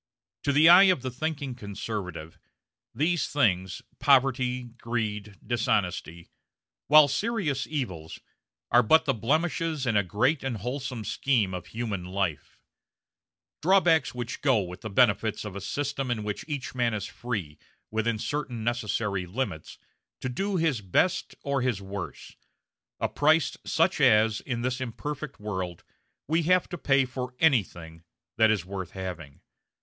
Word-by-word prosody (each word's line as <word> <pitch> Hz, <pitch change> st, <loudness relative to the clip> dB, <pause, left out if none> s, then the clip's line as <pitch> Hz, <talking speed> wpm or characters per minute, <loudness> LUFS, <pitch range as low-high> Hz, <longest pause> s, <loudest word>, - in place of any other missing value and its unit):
To 140 Hz, -, +3 dB
the 150 Hz, +3 st, +6 dB
eye 180 Hz, +3 st, +9 dB
of 185 Hz, -9 st, +3 dB
the 130 Hz, -, -3 dB
thinking 140 Hz, 0 st, -3 dB
conservative, 100 Hz, -7 st, -6 dB, 0.5 s
these 165 Hz, +1 st, 0 dB
things 95 Hz, -10 st, 0 dB, 0.2 s
poverty, 130 Hz, -2 st, +3 dB
greed, 110 Hz, -4 st, -4 dB
dishonesty 90 Hz, -7 st, -1 dB, 0.6 s
while 150 Hz, 0 st, +8 dB
serious 160 Hz, -, -1 dB
evils, 95 Hz, -, -4 dB, 0.5 s
are 120 Hz, -, +7 dB
but 160 Hz, +8 st, +4 dB
the 135 Hz, -, +2 dB
blemishes 155 Hz, -, 0 dB
in 115 Hz, -3 st, +1 dB
a 105 Hz, -, +5 dB
great 125 Hz, -, 0 dB
and 130 Hz, -4 st, -2 dB
wholesome 125 Hz, +1 st, -4 dB
scheme 110 Hz, -8 st, +1 dB
of 90 Hz, -1 st, -6 dB
human 110 Hz, -5 st, -4 dB
life; 90 Hz, -4 st, -3 dB, 1.0 s
drawbacks 165 Hz, -6 st, +3 dB
which 120 Hz, -1 st, -5 dB
go 130 Hz, -6 st, +3 dB
with 90 Hz, 0 st, -9 dB
the 110 Hz, -, -5 dB
benefits 110 Hz, -1 st, +2 dB
of 100 Hz, -2 st, -7 dB
a 100 Hz, -, -5 dB
system 135 Hz, +5 st, -3 dB
in 115 Hz, -3 st, -1 dB
which 105 Hz, -1 st, -4 dB
each 145 Hz, -4 st, -4 dB
man 120 Hz, -3 st, 0 dB
is 100 Hz, -2 st, -3 dB
free, 100 Hz, -12 st, -5 dB, 0.3 s
within 110 Hz, +1 st, 0 dB
certain 125 Hz, -2 st, -3 dB
necessary 105 Hz, -5 st, -1 dB
limits, 90 Hz, -, -4 dB, 0.4 s
to 130 Hz, -, -3 dB
do 195 Hz, +10 st, -2 dB
his 160 Hz, -9 st, +1 dB
best 100 Hz, -, 0 dB
or 140 Hz, -1 st, 0 dB
his 120 Hz, -5 st, 0 dB
worst; 100 Hz, -2 st, -7 dB, 0.6 s
a -, -, +1 dB
price 155 Hz, +2 st, +2 dB
such -, -, +2 dB
as, 110 Hz, 0 st, +4 dB
in 120 Hz, -2 st, -4 dB
this 130 Hz, +1 st, -1 dB
imperfect 140 Hz, +3 st, -5 dB
world, 95 Hz, -5 st, -4 dB, 0.4 s
we 160 Hz, +3 st, +2 dB
have 180 Hz, +2 st, +3 dB
to 175 Hz, -, -5 dB
pay 135 Hz, -2 st, +3 dB
for 125 Hz, 0 st, -6 dB
anything 90 Hz, -, +1 dB, 0.4 s
that 110 Hz, -1 st, +5 dB
is 105 Hz, -6 st, +1 dB
worth 95 Hz, -2 st, -6 dB
having. 90 Hz, -7 st, -7 dB
120 Hz, 145 wpm, -27 LUFS, 100-140 Hz, 1.0 s, eye